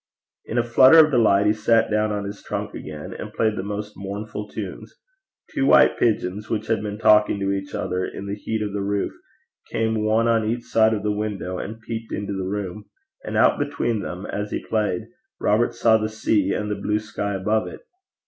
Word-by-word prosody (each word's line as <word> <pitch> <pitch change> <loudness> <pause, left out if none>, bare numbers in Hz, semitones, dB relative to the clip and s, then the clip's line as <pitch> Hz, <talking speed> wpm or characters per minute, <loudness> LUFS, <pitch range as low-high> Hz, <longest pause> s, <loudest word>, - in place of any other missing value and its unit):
In 115 - -4
a 120 - +3
flutter 130 +6 +7
of 155 -1 +7
delight 105 -5 +4
he 105 - +4
sat 110 +1 +2
down 105 0 +1
on 105 -1 -2
his 100 0 -7
trunk - - -4
again 75 -1 -7
and - - -7
played 110 -1 +1
the 95 - -3
most 105 +1 -5
mournful 105 +2 -6
of - - -19
tunes. - - -7 0.6
Two 275 -3 +1
white - - +6
pigeons, 105 -2 0
which 110 -1 -1
had 115 - 0
been 105 -1 -4
talking 105 -2 +4
to 100 0 0
each 95 0 -4
other 90 0 -2
in 95 - -6
the 100 - -4
heat 110 +1 -3
on 105 -1 -4
the 100 - -2
roof, 100 0 -1 0.6
came 110 -1 0
one 110 +2 +2
on 115 -1 +3
each 120 +1 -2
side 110 -1 +3
of 105 - -5
the 105 - +1
window 100 -4 -3
and 110 +2 -7
peeped 115 0 -6
into 100 0 -3
the 95 -1 -3
room; 100 0 -4 0.4
and - - -3
out - - +4
between 120 -6 -1
them, 90 +1 -6
as 105 0 -4
he - - -4
played, 105 -5 0 0.4
Robert 115 +3 +2
saw 115 -1 +4
the 110 0 -2
sea, 105 -2 +1
and 105 0 -2
the - - 0
blue 105 - +1
sky 100 -2 -3
above 105 +3 0
it. - - -9
105 Hz, 215 wpm, -23 LUFS, 100-110 Hz, 0.6 s, flutter